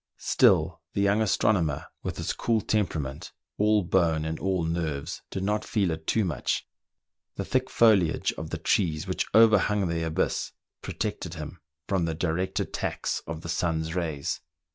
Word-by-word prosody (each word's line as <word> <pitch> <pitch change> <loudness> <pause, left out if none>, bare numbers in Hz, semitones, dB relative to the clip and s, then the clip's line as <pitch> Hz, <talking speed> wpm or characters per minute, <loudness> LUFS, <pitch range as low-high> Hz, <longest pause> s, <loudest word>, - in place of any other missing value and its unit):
Still, - - +3
the 100 - 0
young 100 +2 +3
astronomer, 95 -8 +1 0.2
with - - -4
his - - -2
cool 115 -1 +1
temperament, 80 -11 -2 0.3
all 105 -1 +4
bone 85 -3 +2
and 80 0 -3
all 95 -3 0
nerves, 80 -4 -2
did 95 - -4
not 105 +2 0
feel 100 -6 0
it 80 0 -6
too 110 -3 +2
much: 85 -6 -2 0.7
the - - -3
thick 130 0 0
foliage 100 -8 +3
of 80 0 -7
the 85 - -3
trees 80 -2 +1
which - - -2
overhung 105 -3 +5
the 85 0 -1
abyss 80 -1 -1 0.3
protected 100 -5 -4
him 80 +2 -7 0.3
from 95 -4 +1
the 80 -1 -2
direct 90 +3 -1
attacks - - -2
of 80 0 -5
the 85 - -7
sun's 80 -1 -1
rays. 80 -6 -2
85 Hz, 160 wpm, -27 LUFS, 80-105 Hz, 0.7 s, overhung